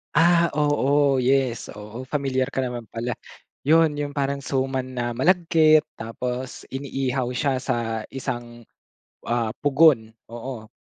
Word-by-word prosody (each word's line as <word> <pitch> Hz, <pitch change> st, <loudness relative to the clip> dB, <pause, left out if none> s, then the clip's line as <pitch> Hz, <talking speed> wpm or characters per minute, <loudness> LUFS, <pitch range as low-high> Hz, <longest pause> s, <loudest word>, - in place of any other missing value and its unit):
Ah, 170 Hz, +1 st, +5 dB
oo 145 Hz, -2 st, +3 dB
yes. 130 Hz, -3 st, +1 dB
Oo, 105 Hz, +3 st, -8 dB
familiar 135 Hz, -3 st, 0 dB
ka 130 Hz, -, -1 dB
naman 120 Hz, -4 st, -6 dB
pala. 120 Hz, +2 st, -3 dB, 0.5 s
Yon 160 Hz, +1 st, +4 dB
yong 145 Hz, 0 st, -4 dB
parang 140 Hz, 0 st, -1 dB
suman 130 Hz, -1 st, -2 dB
na 120 Hz, -1 st, -1 dB
malagkit. 160 Hz, +1 st, +4 dB
Tapos, 125 Hz, +3 st, -5 dB
iniihaw 135 Hz, -2 st, -2 dB
siya 130 Hz, +1 st, -1 dB
sa 115 Hz, -4 st, -2 dB
isang, 120 Hz, -3 st, -6 dB, 0.6 s
ah, 120 Hz, -1 st, -1 dB
pugon, 145 Hz, -6 st, +4 dB, 0.2 s
oo. 115 Hz, -1 st, -7 dB
130 Hz, 120 wpm, -24 LUFS, 120-145 Hz, 0.6 s, Ah